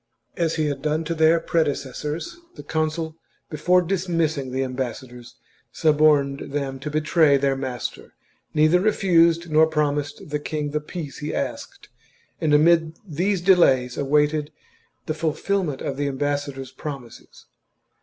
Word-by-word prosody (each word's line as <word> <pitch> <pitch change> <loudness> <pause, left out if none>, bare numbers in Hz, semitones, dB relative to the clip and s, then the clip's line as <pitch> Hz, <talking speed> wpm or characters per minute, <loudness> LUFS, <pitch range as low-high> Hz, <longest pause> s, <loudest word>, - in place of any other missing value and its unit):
As 165 -1 0
he 155 -1 0
had 140 -2 -2
done 155 +2 0
to 165 +1 -2
their 160 +1 +4
prede 165 0 +1
cessors, 150 - -6 0.2
the - - -10
consul 160 0 -2 0.3
before 180 +4 +3
dismissing 165 -7 -1
the 130 +1 -1
ambassadors 125 -1 -6 0.4
suborned 145 -3 +2
them 135 -2 -3
to 145 +3 -5
betray 155 -1 +3
their 135 0 +1
master, 130 -2 -6 0.4
neither 155 +3 +4
refused 170 -4 +3
nor 155 +1 +5
promised 150 -2 -2
the 150 - -1
king 150 0 -3
the 150 +1 -1
peace 150 -2 -7
he 150 +1 -4
asked, - - -5 0.5
and 155 - +1
amid 160 +2 +4
these 180 +4 -1
delays 135 -10 +4
awaited 150 +1 +1 0.5
the 155 - -2
fulfilment 160 0 -1
of 135 - -3
the 145 0 -1
ambassa 145 +1 -1
dors' 135 -1 -9
promises. 135 -6 -9
150 Hz, 140 wpm, -23 LUFS, 140-165 Hz, 0.5 s, nor